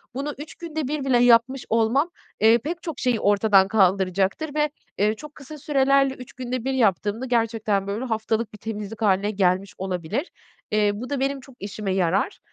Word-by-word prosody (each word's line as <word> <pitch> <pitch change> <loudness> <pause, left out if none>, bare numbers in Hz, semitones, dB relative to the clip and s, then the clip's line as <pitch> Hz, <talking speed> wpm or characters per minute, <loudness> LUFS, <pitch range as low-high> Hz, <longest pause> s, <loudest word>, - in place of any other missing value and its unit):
Bunu 280 +2 -3
3 300 +2 -9
günde 315 -5 -4
1 295 -1 -3
bile 260 -2 +3
yapmış 245 +2 +4
olmam, 230 +8 +2 0.3
eee, 225 +2 +6
pek 325 +9 -5
çok 325 -6 -5
şeyi 250 -3 +1
ortadan 200 -1 +4
kaldıracaktır 195 - +1
ve, 300 0 +2 0.3
eee, 210 +2 +2
çok 300 +5 -11
kısa 300 +2 -10
sürelerle 275 -1 +2
3 250 -2 -12
günde 255 -1 -4
1 270 - 0
yaptığımda 215 0 +1
gerçekten 225 -5 0
böyle 215 +6 -3
haftalık 220 -1 -1
bir - - -10
temizlik 215 0 -6
hâline 205 0 +2
gelmiş 190 -1 +1
olabilir. 190 - -3 0.4
Eee, 210 -1 +3
bu 250 +5 -6
da 285 - -2
benim 275 +1 -1
çok 270 -1 -16
işime 200 -1 -4
yarar. 190 - 0
230 Hz, 175 wpm, -24 LUFS, 205-270 Hz, 0.4 s, eee